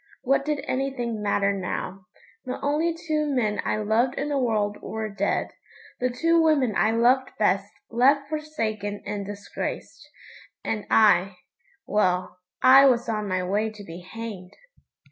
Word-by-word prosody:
What 275 Hz, +1 st, +2 dB
did 295 Hz, -2 st, -2 dB
anything 250 Hz, -4 st, -2 dB
matter 200 Hz, -1 st, +1 dB
now? 190 Hz, 0 st, -5 dB, 0.4 s
The 255 Hz, -, -4 dB
only 300 Hz, +4 st, +1 dB
two 315 Hz, -2 st, -2 dB
men 240 Hz, -7 st, 0 dB
I -, -, -1 dB
loved 220 Hz, +5 st, +1 dB
in 290 Hz, -, -2 dB
the 285 Hz, -1 st, 0 dB
world 215 Hz, -4 st, 0 dB
were 220 Hz, -1 st, -4 dB
dead; 200 Hz, 0 st, -1 dB, 0.5 s
the 250 Hz, -, +1 dB
two 330 Hz, +7 st, +2 dB
women 290 Hz, -8 st, +3 dB
I 215 Hz, -, +3 dB
loved 245 Hz, +3 st, +3 dB
best -, -, +1 dB, 0.2 s
left 275 Hz, +4 st, +3 dB
forsaken 225 Hz, -10 st, -4 dB
and 200 Hz, -1 st, -4 dB
disgraced; 205 Hz, +8 st, -6 dB, 0.5 s
and 210 Hz, -2 st, -3 dB
I 200 Hz, -3 st, +4 dB, 0.5 s
well, 185 Hz, -3 st, 0 dB, 0.2 s
I 270 Hz, +2 st, +8 dB
was 240 Hz, -2 st, +2 dB
on 215 Hz, -2 st, -2 dB
my 185 Hz, -1 st, -1 dB
way 205 Hz, +4 st, 0 dB
to 215 Hz, -1 st, -11 dB
be 170 Hz, -2 st, -9 dB
hanged! 190 Hz, -1 st, -8 dB
225 Hz, 145 wpm, -25 LUFS, 205-275 Hz, 0.5 s, I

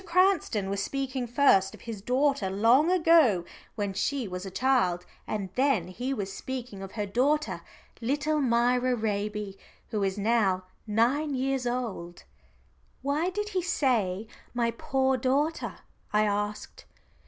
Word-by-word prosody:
Cranston 345 Hz, -, +2 dB
was 200 Hz, 0 st, -1 dB
speaking 265 Hz, +1 st, -2 dB
first 225 Hz, -7 st, +4 dB
of -, -, -17 dB
his 225 Hz, -4 st, -7 dB
daughter 255 Hz, -2 st, +1 dB
long 230 Hz, -, +4 dB
ago 320 Hz, -, +4 dB, 0.3 s
when 205 Hz, -3 st, -2 dB
she 250 Hz, +5 st, -1 dB
was 180 Hz, +1 st, -5 dB
a -, -, -4 dB
child, 185 Hz, -6 st, +1 dB, 0.2 s
and 195 Hz, -4 st, -3 dB
then 255 Hz, -9 st, +1 dB
he 245 Hz, +8 st, -4 dB
was 200 Hz, -7 st, -3 dB
speaking 250 Hz, -6 st, -6 dB
of 195 Hz, -1 st, -8 dB
her 210 Hz, -2 st, -2 dB
daughter, 245 Hz, -, +1 dB, 0.4 s
little 295 Hz, +5 st, 0 dB
Myra 245 Hz, 0 st, +2 dB
Raby, 210 Hz, -2 st, -3 dB, 0.3 s
who 215 Hz, -, -1 dB
is 195 Hz, 0 st, 0 dB
now 205 Hz, -3 st, +2 dB, 0.2 s
nine 260 Hz, +7 st, +1 dB
years 265 Hz, -1 st, -1 dB
old." 225 Hz, -9 st, -4 dB, 0.8 s
"Why 295 Hz, +6 st, +1 dB
did 420 Hz, +3 st, -3 dB
he 375 Hz, -3 st, -1 dB
say 225 Hz, -, 0 dB, 0.3 s
my 235 Hz, -1 st, +1 dB
'poor' 265 Hz, 0 st, 0 dB
daughter?" 280 Hz, +6 st, 0 dB, 0.4 s
I 210 Hz, 0 st, +3 dB
asked. 205 Hz, 0 st, -3 dB
240 Hz, 140 wpm, -28 LUFS, 200-275 Hz, 0.8 s, first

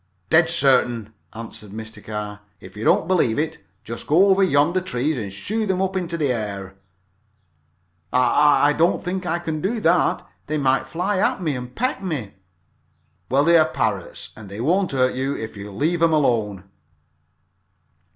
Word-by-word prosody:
"Dead 160 Hz, +1 st, +5 dB
certain," 125 Hz, -8 st, +2 dB, 0.2 s
answered 110 Hz, -2 st, -9 dB
Mr. 110 Hz, +2 st, -8 dB
Carr. 105 Hz, -1 st, -5 dB, 0.2 s
"If 95 Hz, +2 st, -13 dB
you 105 Hz, -, -6 dB
don't 160 Hz, -, +3 dB
believe 170 Hz, -12 st, +2 dB
it, 155 Hz, +2 st, -2 dB, 0.2 s
just 115 Hz, +1 st, -6 dB
go 180 Hz, +7 st, +5 dB
over 195 Hz, 0 st, +4 dB
to 190 Hz, -, +2 dB
yonder 160 Hz, +6 st, +3 dB
trees 150 Hz, -3 st, -1 dB
and 105 Hz, -6 st, -5 dB
shoo 210 Hz, -, -3 dB
them 190 Hz, -1 st, 0 dB
up 190 Hz, 0 st, -1 dB
into 175 Hz, -2 st, -2 dB
the 145 Hz, -5 st, +1 dB
air." 100 Hz, -4 st, -5 dB, 1.4 s
"I 145 Hz, +3 st, +4 dB
I -, -, +3 dB
don't 165 Hz, +3 st, +1 dB
think 180 Hz, 0 st, -3 dB
I 170 Hz, 0 st, 0 dB
care 170 Hz, -2 st, -4 dB
to 155 Hz, -, -4 dB
do 220 Hz, +5 st, -1 dB
that 170 Hz, -2 st, +2 dB, 0.2 s
they 155 Hz, -, -1 dB
might 135 Hz, -2 st, +1 dB
fly 185 Hz, +7 st, -1 dB
at -, -, +1 dB
me 150 Hz, -4 st, 0 dB
and 125 Hz, 0 st, -7 dB
peck 255 Hz, -4 st, -1 dB
me." 150 Hz, -, -4 dB, 1.0 s
"Well, 135 Hz, +3 st, +3 dB
they 170 Hz, +1 st, +6 dB
are 155 Hz, 0 st, +3 dB
parrots -, -, -3 dB
and 110 Hz, -3 st, -11 dB
they 100 Hz, +2 st, -7 dB
won't 180 Hz, +9 st, +1 dB
hurt 130 Hz, -1 st, +2 dB
you 135 Hz, +2 st, -2 dB
if 110 Hz, -1 st, -6 dB
you 100 Hz, 0 st, -8 dB
leave 160 Hz, -, -1 dB
'em 165 Hz, -1 st, +4 dB
alone." 110 Hz, -10 st, +1 dB
145 Hz, 180 wpm, -22 LUFS, 115-175 Hz, 1.4 s, they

